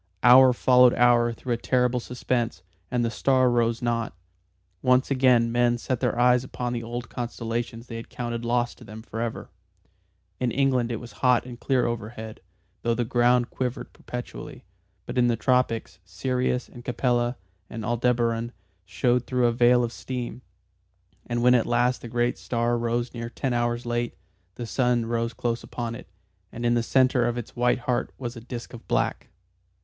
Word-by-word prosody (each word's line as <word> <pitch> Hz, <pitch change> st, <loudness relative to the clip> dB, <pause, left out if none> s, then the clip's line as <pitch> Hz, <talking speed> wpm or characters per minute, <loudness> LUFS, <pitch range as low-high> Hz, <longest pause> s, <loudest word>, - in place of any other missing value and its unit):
Hour 130 Hz, +1 st, +8 dB
followed 125 Hz, 0 st, +5 dB
hour 120 Hz, -1 st, +4 dB
through 120 Hz, +2 st, -3 dB
a -, -, -1 dB
terrible 125 Hz, +1 st, +1 dB
suspense, 120 Hz, -4 st, -2 dB, 0.3 s
and 120 Hz, -1 st, 0 dB
the 115 Hz, -, -1 dB
star 130 Hz, +2 st, +3 dB
rose 115 Hz, 0 st, +1 dB
not. 115 Hz, -1 st, -1 dB, 0.7 s
Once 125 Hz, +2 st, +3 dB
again 125 Hz, -3 st, +4 dB
men 120 Hz, 0 st, +2 dB
set 125 Hz, +1 st, -2 dB
their -, -, 0 dB
eyes 125 Hz, 0 st, +4 dB
upon 125 Hz, -1 st, -4 dB
the 120 Hz, -, -2 dB
old 120 Hz, +1 st, -5 dB
constellations 115 Hz, -1 st, -4 dB
they 115 Hz, -2 st, -7 dB
had 115 Hz, -, -9 dB
counted 120 Hz, -1 st, -4 dB
lost 120 Hz, 0 st, 0 dB
to -, -, -12 dB
them 110 Hz, +2 st, -10 dB
forever. 115 Hz, 0 st, -5 dB, 0.9 s
In 125 Hz, -, +1 dB
England 130 Hz, -2 st, +1 dB
it -, -, -1 dB
was 120 Hz, -2 st, -10 dB
hot 125 Hz, -2 st, +4 dB
and 120 Hz, -2 st, -9 dB
clear 130 Hz, -3 st, +1 dB
overhead, 110 Hz, -1 st, -5 dB, 0.4 s
though 115 Hz, 0 st, +1 dB
the 120 Hz, 0 st, -1 dB
ground 120 Hz, 0 st, +2 dB
quivered 130 Hz, 0 st, -4 dB
perpetually, 125 Hz, 0 st, -8 dB, 0.4 s
but -, -, -2 dB
in 120 Hz, -, +4 dB
the 120 Hz, -, +2 dB
tropics, 125 Hz, -4 st, 0 dB
Sirius 125 Hz, +7 st, -1 dB
and 120 Hz, -, -12 dB
Capella 120 Hz, 0 st, 0 dB, 0.3 s
and 110 Hz, -2 st, -6 dB
Aldebaran 120 Hz, 0 st, 0 dB, 0.3 s
showed 120 Hz, +6 st, 0 dB
through 125 Hz, -1 st, +1 dB
a 120 Hz, -, +4 dB
veil 120 Hz, +1 st, +4 dB
of 120 Hz, 0 st, -3 dB
steam. 125 Hz, -1 st, -5 dB, 0.9 s
And 120 Hz, 0 st, -1 dB
when 125 Hz, 0 st, +6 dB
at 120 Hz, -2 st, +3 dB
last 120 Hz, +1 st, +1 dB
the -, -, -7 dB
great 120 Hz, +1 st, 0 dB
star 120 Hz, 0 st, 0 dB
rose 120 Hz, +1 st, -1 dB
near 115 Hz, -1 st, -5 dB
ten 130 Hz, +1 st, -2 dB
hours 120 Hz, 0 st, -1 dB
late, 120 Hz, 0 st, -2 dB, 0.4 s
the 120 Hz, -, -5 dB
sun 120 Hz, -1 st, +1 dB
rose 115 Hz, 0 st, -1 dB
close 120 Hz, -1 st, -2 dB
upon 120 Hz, -2 st, -5 dB
it, 120 Hz, -, -9 dB, 0.4 s
and 120 Hz, +1 st, -5 dB
in 120 Hz, -, +3 dB
the 120 Hz, -, +2 dB
centre 125 Hz, 0 st, +3 dB
of 120 Hz, 0 st, -2 dB
its 120 Hz, -, -7 dB
white 120 Hz, +1 st, +2 dB
heart 125 Hz, 0 st, -1 dB
was 120 Hz, -1 st, -5 dB
a 115 Hz, -, -8 dB
disc 120 Hz, +1 st, -8 dB
of 120 Hz, -, -11 dB
black. -, -, -1 dB
120 Hz, 175 wpm, -25 LUFS, 115-125 Hz, 0.9 s, Hour